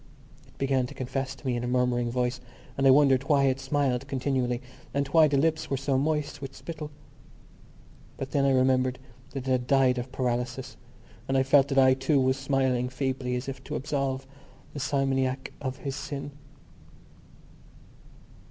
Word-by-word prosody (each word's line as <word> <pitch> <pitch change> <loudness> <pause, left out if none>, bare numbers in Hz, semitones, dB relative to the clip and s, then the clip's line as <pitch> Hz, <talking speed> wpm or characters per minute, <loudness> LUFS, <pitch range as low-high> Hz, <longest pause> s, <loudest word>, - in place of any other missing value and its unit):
It - - -24
began 135 -2 +1
to - - -11
confess 135 +1 -3
to 135 - -18
me 125 -2 0
in 120 - -3
a - - -2
murmuring 125 -1 +1
voice 125 +1 -1 0.3
and 135 0 +2
I - - +8
wondered 135 -1 +5
why 140 -2 +4
it 135 -1 +2
smiled 135 -1 0
continually 130 -3 -1 0.4
and 140 0 +1
why 160 -2 +6
the 140 -1 +1
lips 155 +2 +1
were 135 - 0
so 140 0 0
moist 145 +1 -1
with 135 -1 -7
spittle. 155 -3 -7 1.3
But 135 - -5
then 140 -2 +2
I 140 - +4
remembered 130 -1 +2 0.3
that 135 -2 -6
it - - +1
had 125 -1 +1
died 130 -2 +3
of 125 +1 -6
paralysis 125 0 -2 0.5
and 135 - +1
I 130 - +4
felt 135 +1 +5
that 135 -1 -2
I 130 -1 +7
too 135 +2 +1
was 130 0 +2
smiling 135 -2 0
feebly 130 -1 -2
as 125 +2 -4
if 135 -1 -6
to - - -4
absolve 135 -2 -2 0.5
the 145 - -5
simoniac 135 -1 0
of 130 -2 -3
his 135 -1 -4
sin. 145 0 -5
135 Hz, 175 wpm, -27 LUFS, 130-140 Hz, 1.3 s, I